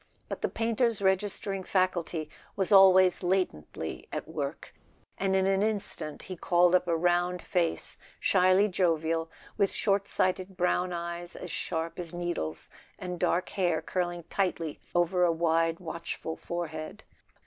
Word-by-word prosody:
But - - -5
the - - 0
painter's 230 0 0
register¬ 195 +1 +1
ing 190 - -5
faculty 180 -4 0 0.3
was 190 -1 -1
always 190 -2 +7
latently 180 - -2
at - - -4
work, - - -5 0.5
and 190 -1 +1
in 190 0 +3
an 195 0 +2
instant 205 -8 -2
he 185 - -6
called 175 +1 +3
up 180 -1 +3
a 170 -1 +2
round 175 +1 +1
face, 175 -2 -1 0.2
shyly 185 +2 +4
jovial, 165 -3 0 0.3
with 200 -1 +3
short 200 -1 +1
sighted 185 0 0
brown 180 0 +1
eyes 170 0 -5
as 180 - -7
sharp 165 0 -3
as 175 -1 -6
needles, 170 - -3 0.3
and 180 -1 -5
dark 175 +2 +1
hair 175 -5 +1
curling 175 +1 -2
tightly 170 -3 -2 0.2
over 175 +1 +3
a 175 - +4
wide 165 0 +1
watchful 170 -2 -5
forehead. 170 +3 -5
180 Hz, 145 wpm, -29 LUFS, 170-190 Hz, 0.5 s, always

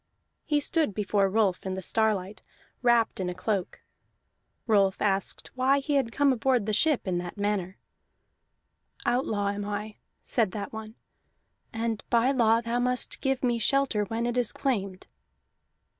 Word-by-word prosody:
He 295 -2 +2
stood 300 - 0
before 200 -1 +1
Rolf 195 -3 +1
in 190 -1 -3
the 190 - -4
starlight, 210 -1 0 0.4
wrapped 240 -4 +3
in 185 -1 -1
a 180 - -5
cloak. 190 0 -3 0.8
Rolf 200 -4 +3
asked 195 -2 -1
why 260 +2 +3
he 280 0 +1
came 275 +4 +2
aboard 250 -2 +1
the 215 - -1
ship 300 -1 +2
in 180 -2 0
that 175 +3 -7
manner. 200 -2 -1 1.3
"Outlaw 215 -5 +1
am 205 0 -3
I," 210 +1 -5 0.3
said 220 -6 0
that 205 0 -5
one, 220 0 -8 0.8
"and 225 -1 -2
by 240 +3 +3
law 230 -3 +3
thou 235 +1 -1
must 250 0 0
give 270 -1 0
me 240 -2 +1
shelter 240 -2 +2
when 225 +3 -2
it 240 +1 -1
is 240 - 0
claimed." 200 -9 -2
220 Hz, 150 wpm, -27 LUFS, 200-250 Hz, 1.3 s, wrapped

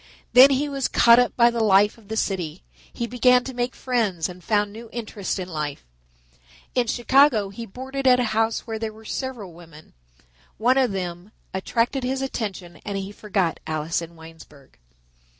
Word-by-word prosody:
Then 255 +3 +9
he 280 +2 +1
was 275 -2 -1
caught 235 0 +6
up 245 - +1
by 235 -1 +5
the 235 -1 -1
life 205 0 +4
of 225 -3 -20
the 220 +1 -4
city; 180 - -2 0.3
he 235 - -4
began 250 +1 +3
to 265 - -7
make 245 +1 -2
friends 215 -10 -1
and 180 0 -11
found 205 -2 0
new 230 +1 -10
interests 215 -5 -4
in 185 -2 -5
life. 150 - -5 0.9
In 245 -2 +1
Chicago 240 -3 +3
he 230 +4 -8
boarded 265 +5 -4
at 250 -1 +6
a - - +2
house 225 +1 0
where 225 -2 -5
there 220 -1 -3
were 220 +1 -16
several 235 -8 -5
women. 165 -2 -15 0.6
One 255 +4 +3
of 255 -5 +2
them 180 0 -5 0.2
attracted 235 +7 -1
his 265 +1 -2
attention 195 - -5
and 200 -1 -4
he 195 0 -5
forgot 200 -5 -2
Alice 155 +2 -2
in 170 0 -9
Winesburg. 160 -4 -16
220 Hz, 180 wpm, -23 LUFS, 185-245 Hz, 0.9 s, Then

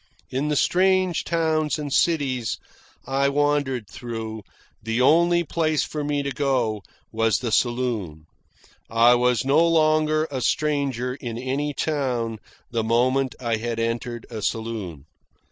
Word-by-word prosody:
In 135 +3 -1
the 150 - 0
strange 185 +2 +2
towns 160 -2 0
and 145 -2 -4
cities 135 -8 +1 0.5
I 135 +2 +1
wandered 145 -5 0
through, 115 -2 -6 0.4
the 115 +2 -2
only 170 +6 +4
place 155 -1 0
for 150 -1 -4
me 145 -1 -1
to 140 - -3
go 125 -7 0 0.3
was 115 -1 +2
the 120 -3 -3
saloon. 115 -11 -1 0.6
I 115 +2 +5
was 125 0 +2
no 140 +3 +4
longer 155 -1 +3
a 130 -2 -3
stranger 135 -3 0
in 120 -4 -6
any 135 +4 -2
town 125 -7 -1 0.3
the 115 -2 0
moment 125 +3 +1
I 115 -3 -1
had 115 +1 -3
entered 115 +1 -3
a 110 -2 -5
saloon. 105 -9 -4
130 Hz, 135 wpm, -24 LUFS, 115-150 Hz, 0.6 s, I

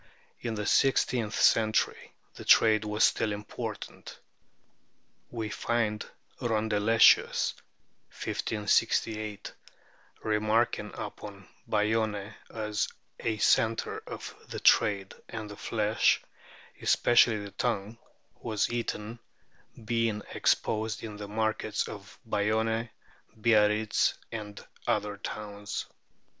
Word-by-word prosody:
In 115 -1 -3
the 105 -1 -3
six 135 +5 +4
teenth 115 -4 -2
century 110 -1 +2 0.2
the - - -10
trade 110 -1 +5
was 105 +1 +1
still 110 - +3
important. 105 0 -6 1.1
We 115 -3 -4
find 110 0 -1 0.4
Rondeletius 110 -1 +4 0.6
(1568) 110 -1 -1 0.7
remarking 110 +2 +1
upon - - -8 0.2
Bayonne 105 -1 0 0.2
as 105 -1 -1 0.3
a 110 -1 -1
centre 115 +2 +2
of - - -7
the - - -6
trade, 100 -2 +3 0.2
and 110 -2 -5
the - - -8
flesh, 105 0 +2 0.6
especially 120 -2 +4
the 100 -1 -7
tongue, 115 -1 -2 0.4
was 110 -2 0
eaten, 115 -1 -3 0.7
being 115 -2 0
exposed 110 0 0
in 105 -2 -6
the 105 0 -7
markets 110 +1 -1
of - - -10
Bayonne, 110 +2 0 0.5
Biarritz, 105 -1 +3 0.2
and 105 -2 -7 0.2
other 105 -1 0
towns. 105 0 -5
110 Hz, 95 wpm, -29 LUFS, 105-115 Hz, 1.1 s, trade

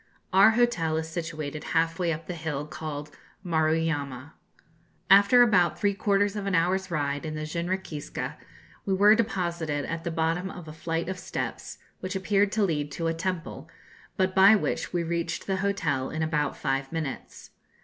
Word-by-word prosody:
Our 195 +3 +8
hotel 170 -10 +2
is 160 0 -2
situated 155 -3 -5
half 165 +1 +1
way 175 -2 +1
up 160 0 -4
the 180 - -5
hill 155 -3 -4
called 150 -1 -6 0.3
Maruyama. 160 -4 0 0.8
After 200 +5 +8
about 180 -8 +3
three 205 -1 +2
quarters 200 +1 +1
of 200 -1 -3
an 195 - +1
hour's 185 +3 +1
ride 145 -3 -1
in 155 -1 -4
the 155 0 -4
jinrikiska, 170 -1 -4 0.5
we 195 - 0
were 205 +2 +7
deposited 170 -9 -1
at 165 0 -4
the - - -2
bottom 165 +3 -1
of 180 -4 -9
a 155 - -8
flight 165 +1 -3
of 185 -1 -4
steps, - - -5 0.2
which 185 +1 -5
appeared 200 +1 +2
to 215 - +2
lead 150 -6 -1
to 165 - -3
a 165 - +1
temple, 180 +1 -4 0.5
but 185 -1 +1
by 195 +3 +7
which 210 - -2
we 175 -1 0
reached 170 0 -2
the 190 -1 -1
hotel 165 -9 -1
in 160 0 -2
about 155 -2 -1
five 135 -1 -2
minutes. 155 -5 -6
165 Hz, 170 wpm, -27 LUFS, 155-190 Hz, 0.8 s, Our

